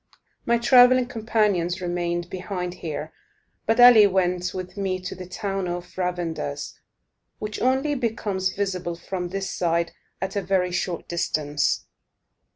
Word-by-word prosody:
My 235 Hz, -, +4 dB
travelling 250 Hz, +1 st, +6 dB
companions 210 Hz, -7 st, 0 dB
remained 175 Hz, -1 st, -2 dB
behind 180 Hz, -1 st, -4 dB
here; 160 Hz, -3 st, -6 dB, 0.5 s
but 225 Hz, +2 st, +2 dB
Ali 240 Hz, -4 st, +9 dB
went 180 Hz, -1 st, 0 dB
with 185 Hz, 0 st, -6 dB
me 195 Hz, -2 st, -1 dB
to 185 Hz, +1 st, -6 dB
the 185 Hz, -1 st, -9 dB
town 195 Hz, 0 st, -3 dB
of 175 Hz, 0 st, -5 dB
Ravandus, 175 Hz, -5 st, -3 dB, 0.6 s
which 210 Hz, -1 st, -5 dB
only 265 Hz, +4 st, +2 dB
becomes 215 Hz, -7 st, -1 dB
visible 185 Hz, -4 st, -2 dB
from 180 Hz, +1 st, -5 dB
this 195 Hz, +1 st, -3 dB
side 170 Hz, -1 st, 0 dB, 0.3 s
at 190 Hz, +2 st, -4 dB
a 200 Hz, -, +1 dB
very 185 Hz, -1 st, +1 dB
short 175 Hz, 0 st, -2 dB
distance. 150 Hz, -3 st, 0 dB
185 Hz, 135 wpm, -24 LUFS, 175-210 Hz, 0.6 s, Ali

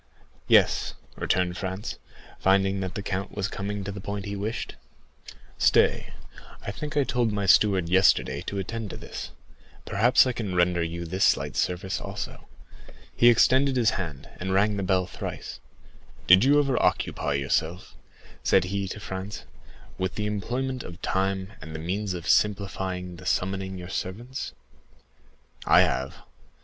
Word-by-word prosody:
"Yes," -, -, +4 dB, 0.2 s
returned 90 Hz, -1 st, 0 dB
Franz, 95 Hz, +3 st, -4 dB, 0.4 s
finding 95 Hz, 0 st, +3 dB
that 95 Hz, -1 st, -4 dB
the 100 Hz, -, -4 dB
count 95 Hz, 0 st, -3 dB
was 100 Hz, -2 st, -1 dB
coming 100 Hz, +1 st, -4 dB
to 100 Hz, -, -4 dB
the 100 Hz, -1 st, -7 dB
point 100 Hz, 0 st, -4 dB
he 100 Hz, 0 st, -4 dB
wished. 105 Hz, +3 st, -4 dB, 0.8 s
"Stay, -, -, +3 dB, 0.5 s
I -, -, -3 dB
think 150 Hz, +7 st, -5 dB
I 145 Hz, -, +5 dB
told 120 Hz, -4 st, 0 dB
my 100 Hz, -1 st, -1 dB
steward 95 Hz, -2 st, +4 dB
yesterday 95 Hz, +2 st, +3 dB
to 100 Hz, -, -3 dB
attend 110 Hz, +2 st, -4 dB
to -, -, -7 dB
this; -, -, -7 dB, 0.6 s
perhaps 120 Hz, +7 st, +4 dB
I 130 Hz, -, +1 dB
can 105 Hz, -6 st, -4 dB
render 90 Hz, 0 st, +3 dB
you 85 Hz, +1 st, -3 dB
this 95 Hz, +4 st, -1 dB
slight -, -, +2 dB
service 90 Hz, +2 st, -1 dB
also." -, -, -6 dB, 0.7 s
He 120 Hz, -, +6 dB
extended 130 Hz, +3 st, +4 dB
his 120 Hz, -3 st, +3 dB
hand, 80 Hz, -8 st, -5 dB
and 95 Hz, +1 st, -1 dB
rang 105 Hz, +2 st, +3 dB
the 100 Hz, -, -2 dB
bell 95 Hz, -1 st, +1 dB
thrice. -, -, -7 dB, 0.7 s
"Did 95 Hz, +3 st, +7 dB
you 140 Hz, +3 st, +5 dB
ever 135 Hz, -4 st, +2 dB
occupy 75 Hz, -, 0 dB
yourself," 80 Hz, +6 st, -1 dB, 0.5 s
said 95 Hz, -, +4 dB
he 100 Hz, +1 st, -2 dB
to 105 Hz, -, -6 dB
Franz, 95 Hz, +1 st, -6 dB, 0.5 s
"with 95 Hz, -1 st, -2 dB
the 105 Hz, -, -2 dB
employment 125 Hz, +5 st, -2 dB
of 90 Hz, -4 st, -9 dB
time 95 Hz, +1 st, -1 dB
and 80 Hz, 0 st, -8 dB
the -, -, -4 dB
means 95 Hz, +4 st, -2 dB
of 85 Hz, -1 st, -6 dB
simplifying 95 Hz, -3 st, 0 dB
the 90 Hz, 0 st, -9 dB
summoning 95 Hz, 0 st, -1 dB
your 90 Hz, 0 st, -8 dB
servants? 120 Hz, +9 st, -5 dB, 1.1 s
I -, -, +7 dB
have. 65 Hz, -, 0 dB
95 Hz, 155 wpm, -26 LUFS, 90-105 Hz, 1.1 s, Did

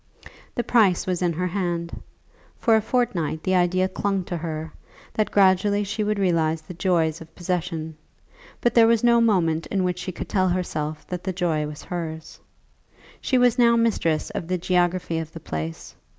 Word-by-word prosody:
The 240 Hz, -, 0 dB
price 210 Hz, -8 st, +3 dB
was 180 Hz, -1 st, -1 dB
in 175 Hz, -1 st, +2 dB
her 180 Hz, +3 st, -2 dB
hand. 175 Hz, -2 st, -3 dB, 0.6 s
For 225 Hz, -3 st, +3 dB
a 220 Hz, -, +3 dB
fortnight 200 Hz, -, -1 dB
the 185 Hz, -, 0 dB
idea 185 Hz, +1 st, +2 dB
clung 195 Hz, 0 st, -1 dB
to 175 Hz, -1 st, -4 dB
her, 160 Hz, -1 st, -5 dB, 0.4 s
that 215 Hz, -, 0 dB
gradually 200 Hz, +1 st, +3 dB
she 205 Hz, +2 st, -2 dB
would 210 Hz, 0 st, 0 dB
realize 165 Hz, -4 st, +1 dB
the 170 Hz, -, -9 dB
joys 170 Hz, -3 st, 0 dB
of 165 Hz, -, -13 dB
possession; 170 Hz, -3 st, -3 dB, 0.7 s
but 240 Hz, -, +2 dB
there 230 Hz, -1 st, +6 dB
was 230 Hz, -1 st, +3 dB
no 235 Hz, -1 st, +5 dB
moment 170 Hz, -8 st, +2 dB
in 195 Hz, -2 st, 0 dB
which 180 Hz, -1 st, -1 dB
she 185 Hz, -, -4 dB
could -, -, -6 dB
tell 185 Hz, -2 st, +1 dB
herself 155 Hz, -4 st, -3 dB
that 180 Hz, -1 st, -5 dB
the 190 Hz, -, -2 dB
joy 165 Hz, -4 st, 0 dB
was 150 Hz, -1 st, -9 dB
hers. 160 Hz, -3 st, -6 dB, 0.8 s
She 260 Hz, -, +1 dB
was 245 Hz, 0 st, +3 dB
now 235 Hz, -1 st, +5 dB
mistress 220 Hz, -9 st, +1 dB
of 165 Hz, -, -5 dB
the 185 Hz, 0 st, 0 dB
geography 180 Hz, -1 st, 0 dB
of 160 Hz, 0 st, -7 dB
the 165 Hz, -, -7 dB
place. 80 Hz, -, -6 dB
180 Hz, 180 wpm, -24 LUFS, 165-200 Hz, 0.8 s, there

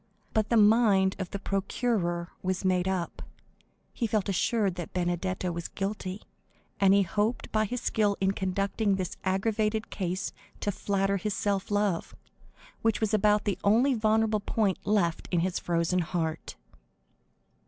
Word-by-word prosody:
But 215 Hz, -1 st, +1 dB
the 235 Hz, -, +3 dB
mind 205 Hz, -3 st, +5 dB
of 185 Hz, -2 st, -3 dB
the -, -, -4 dB
procureur 195 Hz, -3 st, -1 dB
was 185 Hz, +1 st, -2 dB
made 185 Hz, -1 st, +2 dB
up; 185 Hz, -3 st, -2 dB, 0.7 s
he 230 Hz, -, -1 dB
felt 210 Hz, -2 st, 0 dB
assured 200 Hz, +1 st, +1 dB
that 175 Hz, -1 st, -7 dB
Benedetto 180 Hz, +1 st, -1 dB
was 170 Hz, 0 st, -4 dB
guilty, 195 Hz, -1 st, -4 dB, 0.6 s
and 195 Hz, -1 st, +5 dB
he 200 Hz, 0 st, +5 dB
hoped 210 Hz, +6 st, -1 dB
by 215 Hz, 0 st, +2 dB
his 245 Hz, +3 st, -4 dB
skill 210 Hz, -4 st, +1 dB
in 190 Hz, 0 st, +2 dB
conducting 195 Hz, +2 st, 0 dB
this 185 Hz, -2 st, -3 dB
aggravated 215 Hz, +3 st, 0 dB
case 185 Hz, -1 st, -3 dB, 0.3 s
to 205 Hz, -, 0 dB
flatter 195 Hz, 0 st, 0 dB
his 210 Hz, +1 st, -2 dB
self 200 Hz, -2 st, -1 dB
love, 205 Hz, -4 st, 0 dB, 0.7 s
which 225 Hz, -1 st, +1 dB
was 220 Hz, -1 st, 0 dB
about 210 Hz, 0 st, +3 dB
the 195 Hz, -3 st, -1 dB
only 235 Hz, +7 st, +4 dB
vulnerable 220 Hz, -1 st, +2 dB
point 200 Hz, -2 st, 0 dB
left 190 Hz, -6 st, +1 dB
in 175 Hz, -2 st, +1 dB
his 185 Hz, +1 st, -1 dB
frozen 170 Hz, +1 st, 0 dB
heart. 165 Hz, -2 st, -3 dB
195 Hz, 150 wpm, -28 LUFS, 185-215 Hz, 0.7 s, mind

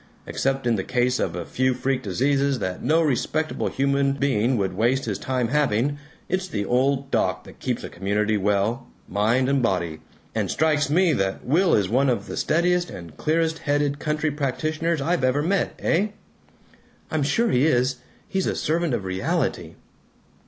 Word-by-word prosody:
Except 135 Hz, -1 st, -1 dB
in 115 Hz, -2 st, +2 dB
the 95 Hz, -, -2 dB
case 125 Hz, +2 st, +1 dB
of 85 Hz, -, -1 dB
a 90 Hz, -, -4 dB
few 130 Hz, 0 st, 0 dB
freak 135 Hz, 0 st, -1 dB
diseases 135 Hz, +6 st, +1 dB
that 95 Hz, -5 st, -4 dB
no 160 Hz, +5 st, +3 dB
respectable 155 Hz, +2 st, -1 dB
human 140 Hz, 0 st, +1 dB
being 130 Hz, -3 st, +1 dB
would 95 Hz, -3 st, -1 dB
waste 120 Hz, +6 st, +1 dB
his 105 Hz, -4 st, -3 dB
time 125 Hz, -3 st, -1 dB
having, 145 Hz, 0 st, +1 dB, 0.3 s
it's 185 Hz, +1 st, -1 dB
the 105 Hz, -, -3 dB
old 135 Hz, +4 st, +1 dB
doc -, -, 0 dB
that -, -, -15 dB
keeps -, -, -2 dB
a -, -, -4 dB
community 105 Hz, +2 st, 0 dB
well, 105 Hz, +5 st, 0 dB, 0.2 s
mind 115 Hz, +7 st, +1 dB
and 140 Hz, 0 st, +2 dB
body. 85 Hz, -8 st, -1 dB, 0.3 s
And -, -, -1 dB
strikes 150 Hz, -1 st, +1 dB
me 170 Hz, +2 st, +3 dB
that 95 Hz, -4 st, -1 dB
Will 170 Hz, +7 st, +3 dB
is 100 Hz, -3 st, +2 dB
one 130 Hz, +7 st, +2 dB
of 115 Hz, -5 st, 0 dB
the -, -, -6 dB
steadiest 175 Hz, +2 st, +1 dB
and 85 Hz, -4 st, -9 dB
clearest 160 Hz, -, 0 dB
headed 145 Hz, 0 st, 0 dB
counter 150 Hz, 0 st, -1 dB
practitioners 155 Hz, +3 st, -1 dB
I've 165 Hz, 0 st, 0 dB
ever 130 Hz, +3 st, +2 dB
met. 195 Hz, +4 st, 0 dB
Eh?" 190 Hz, +6 st, +1 dB, 1.0 s
"I'm 155 Hz, -2 st, 0 dB
sure 205 Hz, +12 st, +1 dB
he 130 Hz, +5 st, +3 dB
is. 130 Hz, -2 st, +2 dB, 0.3 s
He's 190 Hz, -1 st, -1 dB
a -, -, 0 dB
servant 165 Hz, -3 st, 0 dB
of 100 Hz, -5 st, -4 dB
reality." 95 Hz, 0 st, -2 dB
135 Hz, 175 wpm, -24 LUFS, 115-155 Hz, 1.0 s, no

